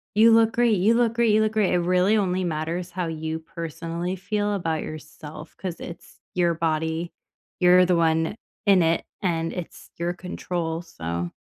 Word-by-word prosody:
"You 225 +2 +7
look 225 0 +5
great. 235 -3 +3
You 200 +5 +4
look 235 -2 +2
great. 235 -1 +3
You 215 - +4
look 215 0 +2
great." 210 -4 +2
It 180 - +3
really 180 +4 +3
only 185 -2 0
matters 170 +2 -3
how 180 -2 -2
you 160 0 -3
personally 165 +2 -5
feel 205 +2 -1
about 165 -5 -1
yourself 155 0 -9
'cause 180 -3 -5
it's 170 -1 -10 0.2
your 175 -1 +3
body. 160 +1 -1 0.5
You're 180 0 +6
the 180 -1 +3
one 160 +3 +2 0.3
in 195 -3 +6
it, 165 0 +2 0.2
and 165 -3 0
it's 180 -3 -8
your 170 +1 -1
control. 175 -2 -4
So 85 - -5
175 Hz, 175 wpm, -24 LUFS, 160-190 Hz, 0.5 s, You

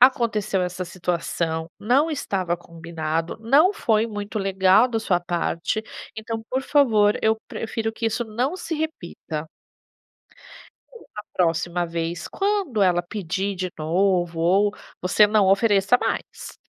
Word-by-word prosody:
aconteceu 225 -7 +3
essa 180 +1 -3
situação, 170 -2 -2
não 270 +9 +2
estava 185 - -1
combinado, 165 0 -4
não 285 - +4
foi 225 - +1
muito 205 0 -5
legal 195 +3 +4
da 230 -2 -1
sua 185 -5 +1
parte, 175 +3 -2 0.3
então, 225 +1 -4
por 260 +1 0
favor, 220 -9 +3
eu 220 0 +3
prefiro 225 0 -3
que 225 0 -3
isso 225 +2 -1
não 245 +10 -2
se 330 -2 -4
repita". 175 - -5 1.7
A 210 - -5
próxima 175 0 0
vez, 165 0 -4
quando 390 - -1
ela 180 -2 +3
pedir 195 +1 -3
de 185 0 -3
novo 175 +1 +1
ou 195 +5 +3 0.3
você 185 +4 +4
não 205 -2 +3
ofereça 195 +2 +4
mais. - - -4
200 Hz, 130 wpm, -23 LUFS, 175-225 Hz, 1.7 s, não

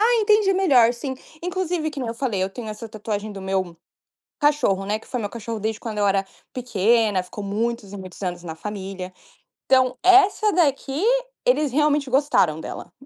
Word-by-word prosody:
Ah, 470 +3 +4
entende 420 -2 +4
melhor 265 -12 +4
sim, 260 +2 -5 0.3
inclusive, 355 -3 -2
que 290 - -8
nem 245 - -3
eu 230 - -3
falei 230 -7 -1
eu 190 - -1
tenho 225 +1 -7
essa 215 +2 -7
tatuagem 215 -1 -4
do 195 - -8
meu 190 -3 -2 0.6
cachorro, 290 - +2
né, 210 +1 0
que - - -18
foi 250 - -3
meu 205 - -2
cachorro 230 -1 -5
desde 220 +1 -2
quando 220 -3 -5
eu 205 - +2
era 195 0 +2 0.3
pequena, 225 -4 +2
ficou 185 +3 -8
muitos 215 0 -2
e - - -6
muitos 185 0 -10
anos 175 -1 -3
na 160 -2 -6
família, 190 0 -6 0.5
então, 260 -1 +3
essa 395 +3 +5
daqui 290 -1 +1 0.4
eles 305 - +2
realmente 295 -1 +2
gostaram 250 - +2
dela. - - -8
230 Hz, 185 wpm, -23 LUFS, 200-295 Hz, 0.6 s, essa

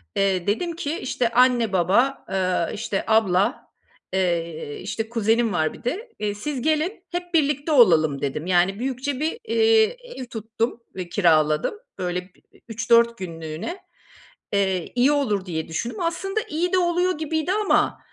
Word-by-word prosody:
Eee, 190 -2 +1
dedim 285 - 0
ki, 320 -2 -3
işte, 245 -2 -1
anne 240 -3 +3
baba, 205 +10 +2
eee, 185 -3 0
işte, 205 -2 -2
abla, 220 +1 +2 0.5
eee, 170 -5 -1
işte, 220 +4 -4
kuzenim 225 -1 +1
var 155 -3 0
bir - - -14
de, 415 - -3
eee, 210 -1 -1
"Siz 260 +4 -4
gelin 315 - 0
hep 355 0 -5
birlikte 295 -1 +1
olalım" 160 - +5
dedim. 145 +2 -3
Yani, 185 +3 +2
büyükçe 260 +1 -2
bir, 315 +8 -1
iii, 450 +1 +3 0.2
ev 260 - -6
tuttum 225 +1 -3
ve 180 -2 -5
kiraladım. 155 - +2 0.3
Böyle, 180 0 -1
bir - - -28 0.3
3-4 235 +1 +3
günlüğüne, 165 - -6 0.7
eee, 190 -3 0
iyi 255 +4 +4
olur 215 -10 0
diye 160 -3 -4
düşündüm. 220 +8 -4
Aslında 390 +5 -1
iyi 350 +4 -1
de - - +5
oluyor 355 -1 +1
gibiydi 315 +2 -1
ama, 415 0 +2
230 Hz, 150 wpm, -23 LUFS, 185-305 Hz, 0.7 s, olalım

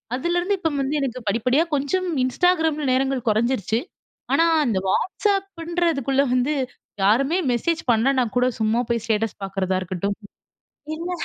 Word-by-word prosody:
அதுலேருந்து 350 +7 0
இப்போ 325 - 0
வந்து 280 +3 -1
எனக்கு 255 -2 -2
படிப்படியா, 250 +8 +2
கொஞ்சம் 360 +7 -1 0.2
Instagramல 320 +1 +1
நேரங்கள் 265 -1 +1
கொறஞ்சிருச்சு. 225 0 +1 0.6
ஆனா 330 - +4 0.2
அந்த 220 -5 0
WhatsAppன்றதுக்குள்ள 340 - 0
வந்து, 255 +4 +1 0.5
யாருமே 275 - +3
மெசேஜ் 320 +7 0
பண்ணல 235 +5 +2
நான் 240 -2 -2
கூட 250 0 +4
சும்மா 220 +2 +2
போய் 235 -2 0
ஸ்டேட்டஸ் 220 -2 -1
பாக்குறதா 190 -1 -1
இருக்கட்டும். 185 +3 -3 0.8
இல்ல 345 +2 -5
270 Hz, 130 wpm, -23 LUFS, 225-330 Hz, 0.8 s, ஆனா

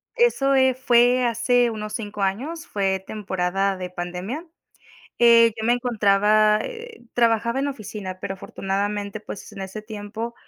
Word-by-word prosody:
eso, 460 - +3
eh, 260 -1 +4
fue 245 0 +4
hace 240 +1 +2
unos 215 -1 -6
5 210 -2 -5
años. 270 - -2
Fue 190 -2 -1
temporada 195 -1 -1
de 180 -1 -5
pandemia. 180 - -5 0.7
Eh, 230 -1 +6
yo 220 - -3
me 240 - +4
encontraba, 215 -3 +3
eh, 470 - -8
trabajaba 235 +1 +2
en 285 - 0
oficina, 205 -7 -6
pero 195 - -4
afortunadamente, 200 +2 -3
pues 210 -2 -9
en - - -9
ese 190 +3 -7
tiempo, 220 +2 -6
215 Hz, 145 wpm, -23 LUFS, 195-245 Hz, 0.7 s, Eh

